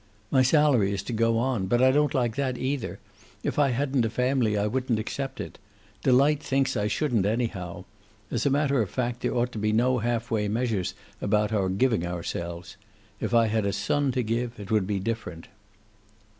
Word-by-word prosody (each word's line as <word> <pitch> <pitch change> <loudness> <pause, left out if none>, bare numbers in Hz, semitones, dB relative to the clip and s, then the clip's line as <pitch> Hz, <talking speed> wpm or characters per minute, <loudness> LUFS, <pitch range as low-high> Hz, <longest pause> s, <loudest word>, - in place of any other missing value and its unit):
"My 130 - +5
salary 130 -7 +4
is 100 - -3
to 120 - -5
go 115 0 +2
on. 120 -5 0
But 120 +5 +2
I 130 +1 +5
don't 150 +2 +2
like 120 -4 +1
that, 130 -3 -1
either. 130 -9 -2 0.5
If - - -1
I 140 -2 +4
hadn't 130 0 +1
a 115 - 0
family 125 -2 +1
I 100 - +1
wouldn't 125 +1 0
accept 135 +5 -4
it. - - -7 0.4
Delight 140 +3 +4
thinks 135 -2 0
I 105 -2 0
shouldn't, 115 -4 +1
anyhow. 95 -6 -3 0.5
As 120 +4 0
a - - +4
matter 140 -2 +2
of 105 - -2
fact, 125 -1 -2
there - - -1
ought 125 0 +1
to 110 - -5
be 105 +1 +1
no 125 +3 +2
half 120 +1 -2
way 105 -2 +1
measures 110 -3 -1 0.3
about 105 +1 +1
our 95 -3 +1
giving 110 0 +1
ourselves. 85 0 -5 0.4
If 120 - -1
I 115 -1 +5
had 110 0 0
a - - +1
son 130 +8 0
to 125 - 0
give 115 +1 -2
it 100 +1 -8
would 105 -4 +2
be 100 -1 -1
different." 95 -5 -5
115 Hz, 200 wpm, -26 LUFS, 105-130 Hz, 0.5 s, My